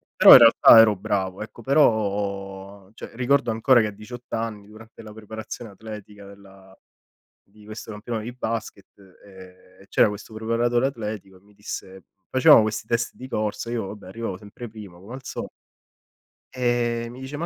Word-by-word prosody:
Però - - +8
in - - +13
realtà 115 0 +8
ero 110 -2 +6
bravo, 95 0 -3
ecco; 115 +2 -13
però, 100 -6 -1
cioè - - -10
ricordo 125 0 +1
ancora 120 +3 +4
che 110 - 0
a - - -5
18 120 +4 -12
anni, 110 -3 -4
durante 110 +1 -15
la 105 -1 -11
preparazione 110 +1 -9
atletica 105 0 -11
della 95 -1 -17 0.7
di 105 +1 -20
questo 110 +1 -9
campionato 110 +1 -5
di 120 - -6
basket, 110 -5 -5 0.4
ehm, 95 -1 -17
c'era - - +4
questo 105 +2 -9
preparatore 115 +3 0
atletico 105 -7 -7
e - - -25
mi 105 +1 -24
disse 95 -2 -8 0.3
facevamo 130 -3 +6
questi 110 0 -4
test 115 0 -1
di 130 - -10
corsa, 110 -1 -3
io 115 -4 -3
vabbè 100 -1 -10
arrivavo 95 -1 -6
sempre 105 +4 -11
prima 105 -5 -12
come 100 +8 -11
al 130 - -11
so - - -6 1.0
e 120 -2 -1
mi 125 +2 -11
dice: 135 +2 -7
“Ma 170 - -3
110 Hz, 170 wpm, -23 LUFS, 100-115 Hz, 1.0 s, in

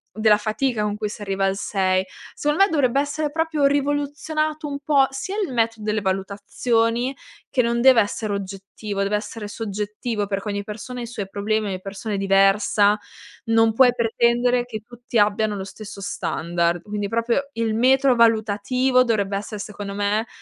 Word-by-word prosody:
della 215 -1 +4
fatica 215 +2 -1
con 210 0 -1
cui 210 -1 -3
si 210 - -9
arriva 195 -1 -1
al 195 0 +1
6. 190 -2 0 0.3
Secondo 295 +6 +2
me 395 - +3
dovrebbe 275 -4 +2
essere 290 +1 -2
proprio 320 -2 0
rivoluzionato 290 +2 -1
un 280 -1 -4
po', 280 -2 +3
sia 270 +8 -5
il 340 - -4
metro 225 -2 0
delle 210 0 -1
valutazioni, 225 +6 0 0.3
che 250 -3 +2
non 235 0 0
deve 260 -3 +7
essere 205 +1 -2
oggettivo, 200 +1 -5
deve 200 +1 0
essere 210 0 -5
soggettivo, 210 0 -4
perché 200 +1 -3
ogni 200 0 -2
persona 230 +4 -7
ha - - -4
i - - -6
suoi 210 -4 -5
problemi, 215 +2 -1
ogni 185 -1 -4
persona 200 +2 -5
è - - -1
diversa, 195 +1 +4 0.5
non 225 -1 +3
puoi 250 +1 +6
pretendere 240 +1 +2
che 220 -3 -6
tutti 240 0 -5
abbiano 210 0 +2
lo 190 - -4
stesso 200 +1 -9
standard. 170 -1 -1
Quindi 205 -1 -3
proprio 235 +4 0
il 230 -3 -1
metro 260 +3 +4
valutativo 230 +3 +3
dovrebbe 205 -5 0
essere, 210 +1 -6
secondo 200 -1 -6
me, 205 +2 0
220 Hz, 170 wpm, -22 LUFS, 200-250 Hz, 0.5 s, deve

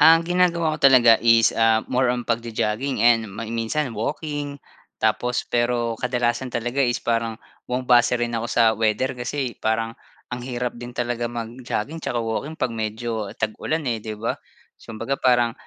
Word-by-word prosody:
Ang 165 +2 +8
ginagawa 170 -3 +2
ko - - -15
talaga 120 -4 +7
is, 115 0 +5
ah, 115 -1 +4
more 125 0 +2
on 120 -1 -3
pagjo-jogging 115 +2 -1
and 115 -2 +4
ma 100 +4 -6
minsan 115 +4 -2
walking, 145 +4 -3 0.4
tapos 125 0 0
pero 120 -1 0
kadalasan 125 +1 -1
talaga 120 +4 -2
is 120 -1 0
parang 115 -1 -1 0.3
bumabase 125 -1 +3
rin 120 0 -1
ako 115 +1 -2
sa 120 - +3
weather. 110 +4 +1
Kasi 125 0 -3
parang 115 +1 0 0.4
ang 125 - -3
hirap 125 -1 -3
din 120 +1 -8
talaga 120 -1 -1
mag-jogging 120 +5 -4
tsaka 125 - -3
walking 115 +7 -3
'pag 120 - 0
medyo 110 -1 -3
tag-ulan, 150 +9 -2
eh, 115 -2 -1
'di 110 -1 -5
ba? 115 - -1 0.4
So, - - -10
kumbaga 135 +5 -2
parang 120 -2 +3
120 Hz, 160 wpm, -23 LUFS, 115-130 Hz, 0.4 s, Ang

